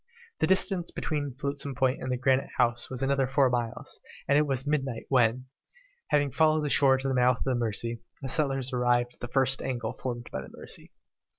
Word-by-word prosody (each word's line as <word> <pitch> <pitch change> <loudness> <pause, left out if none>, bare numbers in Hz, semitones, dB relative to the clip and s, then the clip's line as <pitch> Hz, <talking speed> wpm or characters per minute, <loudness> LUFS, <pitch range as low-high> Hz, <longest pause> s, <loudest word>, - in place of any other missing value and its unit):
The - - +2
distance 190 -2 +4
between 145 -4 -3
Flotsam 140 0 -4
Point 130 0 +1
and 125 -1 -2
Granite 130 +1 +2
House 120 -1 +1
was 130 0 -3
another 135 -1 +1
four 135 -1 +3
miles, 120 -2 -3 0.3
and 140 - +3
it 150 +1 +3
was 135 -1 -1
midnight 135 -5 -2
when, 125 -4 +5
after 125 +3 -9 0.6
having 145 -2 +2
followed 155 +2 +3
the - - -1
shore 135 -2 +5
to 130 +1 -3
the 135 - 0
mouth 125 -1 +3
of - - -4
the 130 - 0
Mercy, 115 0 -2 0.2
the 135 - -5
settlers 135 -3 0
arrived 120 0 +1
at - - -26
the 120 - -5
first 135 +1 +2
angle 120 -3 -3
formed 120 -2 -5
by - - -4
the - - -10
Mercy. - - -8
130 Hz, 205 wpm, -28 LUFS, 120-140 Hz, 0.6 s, when